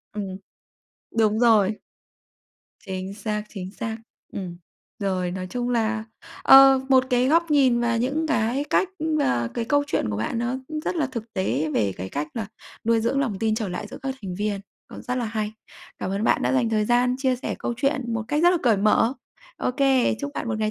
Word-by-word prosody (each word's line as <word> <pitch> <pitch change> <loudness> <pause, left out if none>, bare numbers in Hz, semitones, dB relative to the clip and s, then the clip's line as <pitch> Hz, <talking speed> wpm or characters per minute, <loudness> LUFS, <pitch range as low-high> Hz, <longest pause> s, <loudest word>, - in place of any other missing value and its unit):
Ừm, 205 - -2 1.0
đúng 215 0 +3
rồi. 220 -4 +5 1.2
Chính 190 +1 -5
xác, 210 0 -3
chính 190 -2 -7
xác. 220 +1 -5 0.4
Ừm. 180 -3 -5 0.4
Rồi 185 -3 -1
nói 185 0 -4
chung 245 0 -2
là, 220 -2 0 0.4
ờ, 270 0 +8
một 260 -1 +5
cái 250 +1 +3
góc 335 +1 +3
nhìn 260 -5 +4
và 235 -1 +1
những 280 +7 0
cái 255 0 0
cách, 375 - +3 0.3
à, 120 - +1
cái 235 - -1
câu 285 +4 +2
chuyện 200 - 0
của 100 - -2
bạn 115 - -2
nó 240 +2 -1 0.3
rất - - -1
là 300 -4 +1
thực 235 -4 -6
tế 155 -4 -1
về 100 -3 +1
cái 95 +1 -5
cách 145 +7 -3
là 220 -3 -3 0.4
nuôi 230 0 +3
dưỡng 270 +5 +1
lòng 220 -8 -1
tin 220 -1 +1
trở 220 -3 -2
lại 180 +3 -5
giữa - - -9
các 270 -1 -2
thành 185 -2 -5
viên 205 0 -2 0.3
cũng - - -10
rất 250 - -3
là 250 -2 -1
hay. 215 -1 -3 0.5
Cảm 185 - -3
ơn 200 +3 -1
bạn - - +2
đã - - +1
dành 250 -4 +2
thời 215 -1 +1
gian 245 +2 +2
chia 260 -2 +1
sẻ 250 - -4
câu 240 - -3
chuyện 265 -3 -1
một 225 - -1
cách 295 +2 +1
rất 350 - +7
là 360 - +2
cởi 230 -5 +4
mở. 215 +4 +3 0.4
Ô - - -1
kê, 265 -2 +2
chúc 285 0 -3
bạn 235 - -3
một 220 - -2
ngày 215 0 0
230 Hz, 210 wpm, -24 LUFS, 200-260 Hz, 1.2 s, ờ